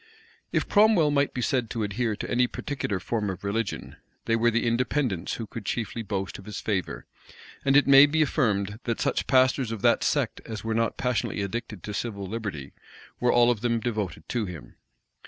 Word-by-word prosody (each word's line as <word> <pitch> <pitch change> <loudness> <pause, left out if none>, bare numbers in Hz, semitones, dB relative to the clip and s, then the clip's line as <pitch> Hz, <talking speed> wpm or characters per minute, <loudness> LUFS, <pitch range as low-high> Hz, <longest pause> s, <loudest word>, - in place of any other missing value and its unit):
If - - 0
Cromwell 205 -8 +4
might 140 -1 +2
be 125 - -3
said 125 -4 0
to 115 -2 -2
adhere 105 +2 -1
to - - -5
any 125 0 +2
particular 120 -10 -3
form 105 +1 -2
of 95 0 -6
religion, 100 +2 -3 0.3
they 115 - +2
were 115 +1 +3
the 115 +1 0
Independents 120 - 0
who 115 - -5
could 110 +1 -8
chiefly 115 +2 -3
boast 95 -3 -4
of 95 - -12
his 105 - -6
favor; 95 -6 -3 0.6
and 135 0 +4
it 145 - +5
may 140 +1 +8
be 155 +2 +2
affirmed, 105 -8 0
that 115 -2 -1
such - - 0
pastors 130 -2 +3
of 110 -3 -5
that - - +4
sect - - 0
as 110 -2 -7
were 110 0 -1
not 115 -1 0
passionately 125 -5 -1
addicted 105 -2 -5
to 105 - -5
civil 100 -2 -4
liberty, 95 -10 -5 0.5
were 125 - +3
all 120 0 +5
of 110 -4 -3
them 115 -1 +1
devoted 110 -5 -3
to 115 -4 -1
him. 80 -8 -9
115 Hz, 195 wpm, -26 LUFS, 100-125 Hz, 0.6 s, may